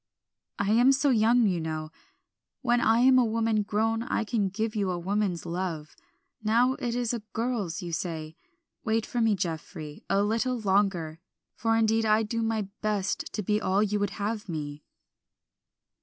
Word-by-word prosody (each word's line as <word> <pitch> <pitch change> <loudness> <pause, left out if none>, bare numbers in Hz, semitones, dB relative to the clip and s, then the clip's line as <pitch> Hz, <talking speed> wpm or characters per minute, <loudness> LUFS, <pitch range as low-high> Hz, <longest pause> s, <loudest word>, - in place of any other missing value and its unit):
"I 200 0 0
am 240 +4 +6
so 275 +1 +2
young, 230 +1 +4
you 185 -4 +1
know; 155 -1 -4 0.7
when 240 -1 +3
I 225 +1 +4
am 255 0 +6
a - - +5
woman 225 -1 +1
grown 220 +2 0
I 230 - -1
can 215 -3 0
give 215 +3 -3
you 200 -3 0
a 180 - -1
woman's 190 0 -1
love; 170 -3 -4 0.5
now 235 +4 +3
it 240 -1 -2
is 245 -1 -1
a 235 - -2
girl's, 225 -6 -2
you 175 - -5
say. 160 -2 -4 0.5
Wait 225 0 0
for 240 - -2
me, 225 -2 +3
Geoffrey, 160 -4 -5
a 200 +1 +3
little 230 +4 0
longer, 190 -6 +1 0.3
for 225 0 +1
indeed 225 0 +2
I 215 +1 +4
do 230 +2 -2
my 225 -1 0 0.2
best 210 -3 -1
to 210 - -2
be 210 +3 +1
all 195 +1 +2
you 210 0 0
would 205 -1 0
have 210 0 -3
me." 150 -2 -5
215 Hz, 170 wpm, -28 LUFS, 185-225 Hz, 0.7 s, am